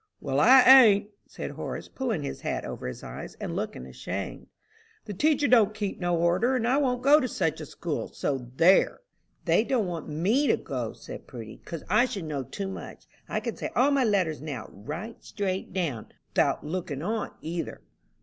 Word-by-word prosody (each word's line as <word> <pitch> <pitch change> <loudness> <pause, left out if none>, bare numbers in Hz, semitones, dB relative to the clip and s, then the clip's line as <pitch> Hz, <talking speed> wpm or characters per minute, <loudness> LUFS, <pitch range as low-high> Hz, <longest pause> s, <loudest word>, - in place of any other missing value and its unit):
"Well, 140 -1 -1
I 255 - +8
ain't," 220 -6 +7 0.2
said - - -6
Horace, - - -6
pulling 230 - -3
his 140 - -5
hat - - -3
over - - -6
his 65 - -7
eyes, - - -8
and - - -5
looking 65 - -4
ashamed. 65 - -6 0.6
"The 210 - -5
teacher 295 - +2
don't 215 -4 +4
keep 205 -3 -3
no 175 -2 +1
order, 180 +10 +2
and 235 -2 0
I 260 +3 +3
won't 250 -4 0
go 290 +3 +7
to 255 - -1
such 160 -8 -1
a 155 - -7
school, 160 0 -4
so 130 -4 -3
there!" 180 - +4 0.4
"They - - +4
don't 235 -3 +1
want 170 -3 -5
me 205 - +1
to - - +3
go," 125 -5 -4
said - - -10
Prudy, 110 -3 -9
"'cause 165 -3 -6
I 215 +7 +4
should 200 -8 -5
know 150 -3 -3
too 195 - -5
much. 190 - -8 0.2
I - - 0
can - - -4
say - - -4
all 270 +4 +4
my 275 -2 +3
letters 185 - +1
now, 140 -7 -6
right 155 - -6
down - - -29
straight, 190 -2 -4 0.6
'thout - - +2
looking 160 -3 -4
on, 215 +3 -2
either." 165 +1 -5
190 Hz, 190 wpm, -27 LUFS, 155-240 Hz, 0.6 s, I